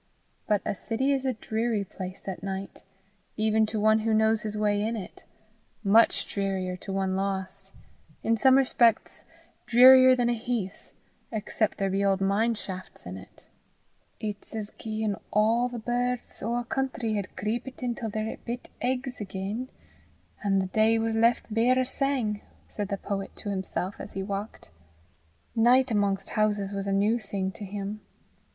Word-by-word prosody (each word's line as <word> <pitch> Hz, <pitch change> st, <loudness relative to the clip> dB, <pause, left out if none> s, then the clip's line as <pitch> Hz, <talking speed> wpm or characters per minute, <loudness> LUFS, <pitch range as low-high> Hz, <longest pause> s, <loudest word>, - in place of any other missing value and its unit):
But 210 Hz, -2 st, +2 dB
a -, -, 0 dB
city 240 Hz, +8 st, 0 dB
is 270 Hz, -1 st, -1 dB
a 260 Hz, -, +1 dB
dreary 220 Hz, -1 st, -1 dB
place 185 Hz, 0 st, -8 dB
at 190 Hz, -, -4 dB
night, 195 Hz, 0 st, -5 dB, 0.6 s
even 220 Hz, 0 st, +3 dB
to 215 Hz, 0 st, -2 dB
one 215 Hz, +1 st, +4 dB
who 220 Hz, 0 st, +1 dB
knows 220 Hz, 0 st, +3 dB
his 215 Hz, 0 st, -4 dB
way 205 Hz, -1 st, +1 dB
in 225 Hz, +2 st, -1 dB
it 200 Hz, -5 st, -8 dB, 0.6 s
much 220 Hz, +3 st, +4 dB
drearier 190 Hz, -2 st, -2 dB
to 195 Hz, -, -7 dB
one 190 Hz, -1 st, 0 dB
lost 190 Hz, -1 st, -3 dB, 0.5 s
in 230 Hz, -, +3 dB
some 260 Hz, +4 st, +5 dB
respects 240 Hz, -4 st, +2 dB, 0.4 s
drearier 255 Hz, +2 st, +8 dB
than 245 Hz, -1 st, +1 dB
a 240 Hz, -, +2 dB
heath 225 Hz, -4 st, -4 dB, 0.4 s
except 215 Hz, -1 st, -1 dB
there 195 Hz, -1 st, 0 dB
be 195 Hz, +1 st, +1 dB
old 195 Hz, -1 st, +2 dB
mine 205 Hz, +4 st, +2 dB
shafts 185 Hz, -3 st, -8 dB
in 90 Hz, +1 st, -6 dB
it. 95 Hz, -, -13 dB, 0.7 s
"It's 210 Hz, 0 st, -6 dB
as 215 Hz, -1 st, -4 dB
gien 215 Hz, -2 st, -2 dB, 0.2 s
a' 225 Hz, +4 st, +3 dB
the 245 Hz, -, -5 dB
birds 245 Hz, +1 st, -2 dB
o' 230 Hz, +3 st, -1 dB
a 240 Hz, -, -1 dB
country 255 Hz, -3 st, -2 dB
had 200 Hz, -3 st, -3 dB
creepit 240 Hz, +5 st, -3 dB
intil 240 Hz, -2 st, -2 dB
their 215 Hz, +1 st, -3 dB
bit 245 Hz, +1 st, -6 dB
eggs 255 Hz, -1 st, -2 dB
again, 200 Hz, +5 st, -4 dB, 0.7 s
an' 195 Hz, -1 st, +2 dB
the 190 Hz, -, +2 dB
day 220 Hz, +4 st, +3 dB
was 225 Hz, 0 st, 0 dB
left 230 Hz, 0 st, +2 dB
bare 240 Hz, +3 st, +3 dB
o' 260 Hz, -, +3 dB
sang!" 255 Hz, -6 st, -1 dB, 0.3 s
said 205 Hz, -1 st, -4 dB
the 200 Hz, 0 st, -2 dB
poet 195 Hz, 0 st, -4 dB
to 205 Hz, -, -6 dB
himself 190 Hz, 0 st, -3 dB
as 200 Hz, -, -8 dB
he 195 Hz, -, -3 dB
walked. 200 Hz, -, -5 dB, 0.8 s
Night 245 Hz, +3 st, +5 dB
amongst 200 Hz, -2 st, +1 dB
houses 205 Hz, -2 st, 0 dB
was 200 Hz, 0 st, -3 dB
a -, -, 0 dB
new 205 Hz, +4 st, +2 dB
thing 195 Hz, -3 st, -3 dB
to 210 Hz, -, -10 dB
him. 200 Hz, +2 st, -5 dB
215 Hz, 165 wpm, -27 LUFS, 195-235 Hz, 0.8 s, drearier